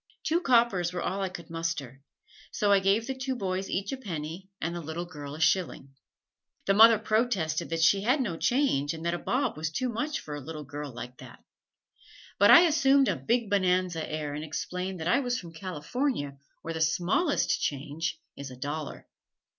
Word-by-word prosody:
Two 335 +3 +1
coppers 235 - +3
were 180 -1 -4
all 195 +2 -2
I 190 - -1
could 175 -2 -10
muster, 150 -6 -4 0.5
so 205 -1 +1
I 200 - +6
gave 195 +4 +2
the 265 - -3
two 260 0 -3
boys 190 -3 -3
each 195 +2 -2
a 270 - -3
penny 175 -4 -6
and 170 +1 -3
the 175 - -4
little 160 +3 -5
girl 145 -4 -8
a - - -9
shilling. 160 -5 0 0.7
The 195 - +3
mother 225 +2 +8
protested 210 -7 0
that 165 0 0
she 195 +4 +5
had 250 +8 +2
no 210 -10 -1
change 165 - +1
and 160 +1 -8
that 170 - +1
a 175 - -2
bob 255 +3 -1
was 155 +1 -2
too 250 +11 -2
much 290 +6 -2
for 150 - -8
a 145 - -5
little 155 +2 -7
girl 145 0 -7
like 125 +1 -9
that, - - -13 1.0
but 205 +1 +6
I 335 - +10
assumed 280 -5 +4
a - - +1
Big 235 -1 0
Bonanza 180 -4 +1
air 150 -2 -3
and 150 +1 -4
explained 180 +4 -4
that 160 - -3
I 180 - +4
was 250 -2 -1
from 170 -2 -11
California 185 - -3 0.3
where 165 - -4
the 160 - -4
smallest 180 - +1
change 150 +4 -2 0.2
is 140 -1 -7
a 130 - -10
dollar. 145 +3 -5
180 Hz, 195 wpm, -28 LUFS, 155-225 Hz, 1.0 s, I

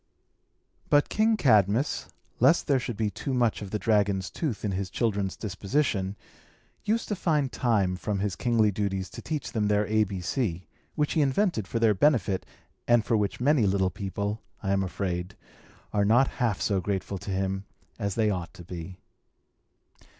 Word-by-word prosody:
But 145 0 +4
King 220 +1 +2
Cadmus, 110 - +3 0.3
lest 135 +8 +4
there 140 -2 +3
should 120 -3 -5
be 110 -2 0
too 135 +4 -3
much 120 -4 +1
of 100 - -6
the 105 - -1
dragon's 100 -4 +1
tooth 135 -10 -3
in 105 - 0
his 95 0 -2
children's 100 -3 -1
disposition, 100 -1 -1 0.7
used 220 +2 0
to 210 - 0
find 150 -7 +1
time 100 -7 +1
from 100 +3 -2
his 100 -1 -1
kingly 110 -2 +2
duties 95 -2 -2
to - - -8
teach 155 -3 -4
them 105 -2 0
their 105 0 +2
A 110 +1 +3
B 95 -1 -5
C 90 -2 -2 0.3
which 150 -2 0
he 160 - +2
invented 140 - +1
for 115 - -2
their 115 -2 +4
benefit, 100 -5 +2 0.4
and 120 -2 +4
for 115 - +2
which 105 -2 0
many 130 -4 +3
little 95 -1 +1
people, 100 +3 -3 0.2
I 95 - 0
am 100 0 +2
afraid, 90 0 -3 0.6
are 100 - +2
not 120 +6 +4
half 115 -5 +1
so 100 -2 +1
grateful 100 0 -3
to - - -8
him 95 0 -1 0.3
as 100 -1 -2
they 110 -2 +2
ought 90 -3 -4
to 90 - -10
be. 90 +1 -8
105 Hz, 175 wpm, -27 LUFS, 95-120 Hz, 0.7 s, But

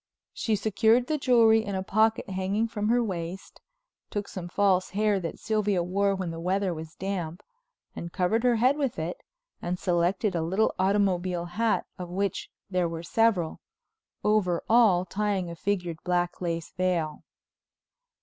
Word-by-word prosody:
She 220 - 0
secured 220 +4 +3
the 305 +3 -1
jewelry 230 -4 +5
in 200 -2 -4
a 190 - -2
pocket 220 +3 +2
hanging 190 +4 0
from 210 -2 -2
her 240 +1 +3
waist, 180 -2 -5 0.5
took 205 -1 -3
some 180 -2 -6
false 185 0 +2
hair 205 0 +1
that 165 -3 -5
Sylvia 210 -4 0
wore 195 +3 +1
when 185 -3 -3
the 165 - -6
weather 185 +2 0
was 160 0 -8
damp, 180 -3 -4 0.5
and 170 - -6
covered 185 +6 +1
her 245 -1 +4
head 255 +5 +3
with 275 -5 -1
it, 165 +3 -4 0.4
and 180 +1 -2
selected 180 +4 +1
a 170 - 0
little 190 +7 +1
automobile 185 -3 +1
hat 220 +6 0
of 180 -1 -5
which 195 +2 -2 0.2
there 180 -3 0
were 165 0 -5
several, 195 -4 +1 0.6
over 200 -5 +2
all 215 -6 +5
tying 195 -2 -1
a - - -7
figured 180 -3 -2
black 175 0 -1
lace 165 -1 -3
veil. 175 -4 -1
190 Hz, 160 wpm, -27 LUFS, 175-215 Hz, 0.6 s, jewelry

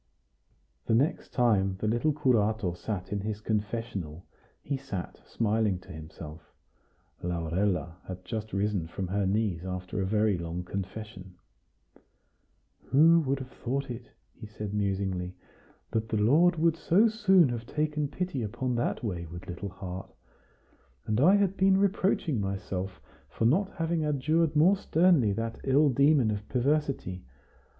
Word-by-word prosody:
The 110 - +3
next 140 +7 +1
time 100 -6 +2
the 110 - -2
little 120 +8 +2
curato 110 - +1
sat 95 0 -5
in 100 - -1
his 105 +1 -3
confessional, 105 -6 -3 0.4
he 140 - -2
sat 130 -10 -6
smiling 110 -3 +1
to - - -13
himself. 80 0 -9 0.8
Laurella 85 0 -1
had 90 0 -7
just 110 -2 -4
risen 100 -4 -1
from 90 +2 -5
her 100 0 0
knees 100 -4 0
after 90 +1 -4
a - - 0
very 105 -2 +2
long 85 +1 -4
confession. 95 0 -7 1.5
"Who 165 +5 +6
would 135 +1 +1
have 130 -1 -8
thought 135 +2 -3
it?" 120 - -8 0.2
he 110 - -10
said 105 -1 -6
musingly 95 -3 -1 0.6
"that 110 -1 -1
the 110 - 0
Lord 155 - +4
would 165 0 +2
so 195 +8 +4
soon 190 - +4
have 120 -1 -4
taken 150 0 -1
pity 150 -2 -3
upon 125 +4 -2
that 120 - -1
wayward 85 -4 -5
little 90 +2 -5
heart? 95 0 -7 1.0
And 110 +1 0
I 185 +7 +7
had 200 -2 +2
been 190 0 +4
reproaching 190 - +1
myself 95 -1 -4 0.3
for 110 - -2
not 190 - +2
having 165 -1 0
adjured 155 +2 +1
more 175 +7 +5
sternly 165 - +3
that 115 +2 -4
ill 140 +2 +4
demon 140 -3 +4
of 105 0 -5
perversity. 135 - 0
110 Hz, 140 wpm, -29 LUFS, 95-145 Hz, 1.5 s, I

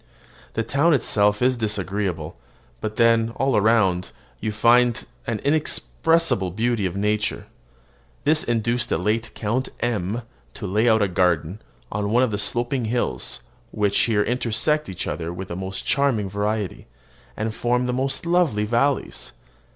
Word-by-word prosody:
The 115 - 0
town 145 +7 +3
itself 105 -3 +2
is 130 0 +3
disagreeable; 100 -6 -2 0.4
but 110 - -4
then, 115 -1 +3
all 135 -2 +1
around, 105 -4 +2 0.3
you 110 - -2
find 120 +3 +3 0.2
an 115 - -1
inexpressible 155 - +2
beauty 110 +1 0
of 90 - -6
nature. 105 +1 -1 0.8
This 150 +1 +3
induced 120 +1 0
the - - +1
late 110 +1 -1
Count 120 +5 -1
M 115 -1 -2 0.3
to - - -6
lay 105 +5 +2
out 110 -2 +4
a - - +2
garden 90 +1 0 0.3
on 100 0 -2
one 120 +4 +3
of 125 - +1
the 105 - -2
sloping 120 +3 0
hills 110 - -2 0.3
which 105 -1 +1
here 105 -3 +3
intersect 125 +5 0
each 95 -1 -4
other 80 +2 -4
with 90 +1 -7
the 85 - -4
most 95 +1 -5
charming 130 -9 +1
variety, 105 0 -2 0.5
and 110 0 -2
form 125 +2 0
the 125 - -1
most 135 +4 -1
lovely 170 -12 +2
valleys. 125 +5 0
110 Hz, 150 wpm, -23 LUFS, 100-125 Hz, 0.8 s, out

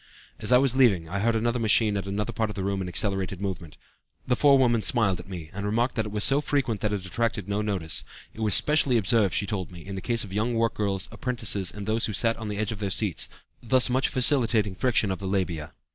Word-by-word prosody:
"As 105 - -3
I 125 - +7
was 130 -1 +2
leaving, 105 -11 +3
I 100 +4 -4
heard 115 +3 +1
another 120 +2 0
machine 110 -1 +2
at 100 -1 -4
another 100 +2 -3
part 110 -1 -1
of 105 - -7
the 95 - -4
room 100 0 -2
in 95 - -4
accelerated 95 0 -1
movement. 85 -6 -6 0.5
The 125 - +1
forewoman 130 -5 +3
smiled 100 -6 +2
at 90 - -11
me, 85 -5 -8
and 100 +1 -6
remarked 115 +5 0
that 115 - -1
that 105 - -5
was 105 0 -1
so 140 +2 +4
frequent 130 -8 -1
that 105 - -1
it 100 -3 -3
attracted 115 0 -2
no 100 +1 -1
notice. 95 -6 -2 0.3
It - - -14
was 110 -3 +5
specially 150 -5 +4
observed, 110 -2 +2
she 100 - 0
told 95 -3 -4
me, 85 -2 -12
in 100 - -7
the 95 - -5
case 115 +1 +1
of 95 -3 -10
young 115 +4 -1
work 115 0 +1
girls, 100 -2 -2
apprentices, 110 -7 -2
and 105 -1 -8
those 110 +2 +1
who 110 - -4
sat 115 +3 +2
on 110 - -7
the 105 -1 -4
edge 110 +1 -2
of 110 - -6
their 100 -2 -2
seats, 95 -3 0 0.3
thus 125 +1 +3
much 130 +1 +1
facilitating 120 -6 +2
friction 110 -1 0
of 95 - -4
the 95 - -5
labia." 85 -6 -2
105 Hz, 250 wpm, -25 LUFS, 95-115 Hz, 0.5 s, I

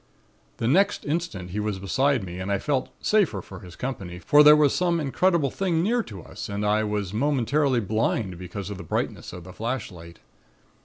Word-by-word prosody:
"The 115 - -1
next 195 +10 +2
instant 145 - -3
he 105 - -3
was 105 -2 -2
beside 130 +6 +1
me 90 -1 -7
and 95 +2 -3
I 100 - +2
felt 135 +4 -1
safer 195 - +2
for 95 +1 -10
his 90 -1 -12
company, 95 -9 -5
for 145 - +5
there 150 0 +9
was 150 -2 +4
some 175 -2 +1
incredible 155 +1 +1
thing 175 -4 0
near 235 +5 +2
to 100 - -10
us - - -8
and 100 +1 -2
I 105 +1 +2
was 105 -3 -2
momentarily 135 +1 +1
blind 105 -3 -1
because 95 +2 -6
of 100 - -6
the - - -7
brightness 80 - -3
of 90 -1 -9
the 90 +1 -11
flashlight. 95 -8 -5
110 Hz, 195 wpm, -25 LUFS, 95-150 Hz, -, there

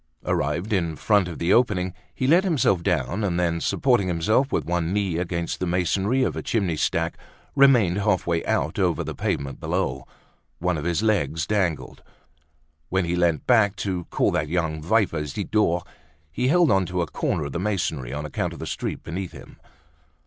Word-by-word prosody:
Arrived 85 +9 -1
in 85 -5 0
front 105 +2 +2
of 85 - -6
the 85 +3 +2
opening, 95 -7 +2 0.2
he 130 - -1
let 170 +7 +5
himself 150 - +2
down, 85 - -1
and 90 -3 0
then, 85 -1 0
supporting 120 -8 +2
himself 110 - +1
with - - 0
one 85 -1 -1
knee 95 -4 0
against 85 -1 -3
the 90 - -1
masonry 95 +8 +1
of - - -1
a - - -3
chimney 100 -8 0
stack, 80 +2 0 0.4
remained 120 -10 +5
half 105 -2 +1
way 85 -1 0
out - - -1
over - - +1
the - - -5
pavement 70 -1 -3
below. 65 0 -2 0.5
One 90 0 0
of 75 0 -4
his 85 +4 0
legs 80 -8 +1
dangled. 85 -11 -1 0.9
When 95 -1 +1
he 85 +1 -1
leant 85 -3 +1
back 110 -5 +4
to 90 -3 -2
call - - +1
that 75 - 0
young 80 -2 -1
viper, 90 -3 +1
Zidore, 90 +3 0 0.5
he 125 +11 -1
held 170 +2 +4
on 95 -2 +2
to 90 -1 -1
a - - -1
corner 75 -1 -2
of 70 - -5
the 85 - -3
masonry, 85 -10 -2
on 75 +2 -4
account 75 - -3
of - - -9
the - - -5
street - - -4
beneath 90 +2 -5
him. - - -13
90 Hz, 185 wpm, -24 LUFS, 80-105 Hz, 0.9 s, let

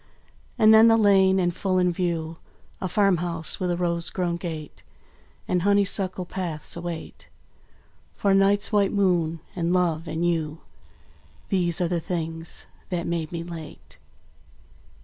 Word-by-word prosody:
And 220 0 +6
then 220 +1 +8
the 225 0 +5
lane; 195 -3 +4
and 175 -2 0
full 185 -2 0
in 180 -1 +3
view 165 -2 -2 0.4
A 185 - -1
farmhouse 175 -5 0
with 180 - -1
a 175 - 0
rose 170 -1 -1
grown 175 -2 -2
gate, 160 -4 -7 0.7
And 180 - +1
honeysuckle 195 -1 +1
paths, 170 -5 -3
await 170 -1 -7 0.9
For 200 -1 +1
night's 195 +1 +3
white 205 -2 +2
moon 175 -5 +1
and 170 -1 -1
love 170 -3 0
and 165 +2 -2
you 160 -2 -1 0.9
These 175 -4 +1
are 175 - +2
the 175 0 -1
things 165 -1 -3 0.2
that 175 -2 -2
made 165 -2 -3
me 170 -1 -4
late. 165 -3 -10
175 Hz, 140 wpm, -25 LUFS, 165-190 Hz, 0.9 s, then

